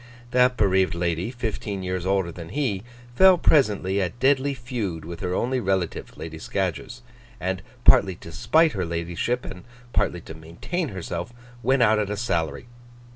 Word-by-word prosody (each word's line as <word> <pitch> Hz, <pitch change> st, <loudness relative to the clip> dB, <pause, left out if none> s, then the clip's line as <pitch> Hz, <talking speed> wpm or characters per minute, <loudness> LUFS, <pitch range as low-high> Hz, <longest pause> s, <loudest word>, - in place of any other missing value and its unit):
That 125 Hz, 0 st, +4 dB
bereaved 95 Hz, -2 st, +2 dB
lady, 85 Hz, +2 st, -1 dB
fifteen 110 Hz, -5 st, -4 dB
years 90 Hz, 0 st, -2 dB
older 95 Hz, -3 st, +1 dB
than 85 Hz, -1 st, -9 dB
he, 125 Hz, -10 st, -1 dB, 0.3 s
fell 190 Hz, +2 st, +7 dB
presently 105 Hz, -, +3 dB
at 95 Hz, +6 st, -3 dB
deadly 135 Hz, +1 st, +3 dB
feud 115 Hz, -, -4 dB
with 85 Hz, 0 st, -7 dB
her 90 Hz, 0 st, -2 dB
only 130 Hz, +5 st, 0 dB
relative, 95 Hz, -5 st, -2 dB
Lady 80 Hz, -1 st, -7 dB
Scadgers; 95 Hz, +7 st, -3 dB, 0.4 s
and, 95 Hz, 0 st, -2 dB, 0.2 s
partly 95 Hz, -2 st, +6 dB
to 85 Hz, -, -11 dB
spite 155 Hz, -, +3 dB
her 95 Hz, -5 st, -2 dB
ladyship, 85 Hz, +8 st, -2 dB
and 90 Hz, -, -8 dB, 0.3 s
partly 90 Hz, -, 0 dB
to 80 Hz, -, -9 dB
maintain 85 Hz, -, -4 dB
herself, 90 Hz, +1 st, -5 dB, 0.3 s
went 130 Hz, +1 st, +3 dB
out 110 Hz, -1 st, +4 dB
at 105 Hz, -2 st, -1 dB
a 105 Hz, -, -2 dB
salary. 85 Hz, -3 st, -1 dB
95 Hz, 160 wpm, -24 LUFS, 85-125 Hz, 0.4 s, fell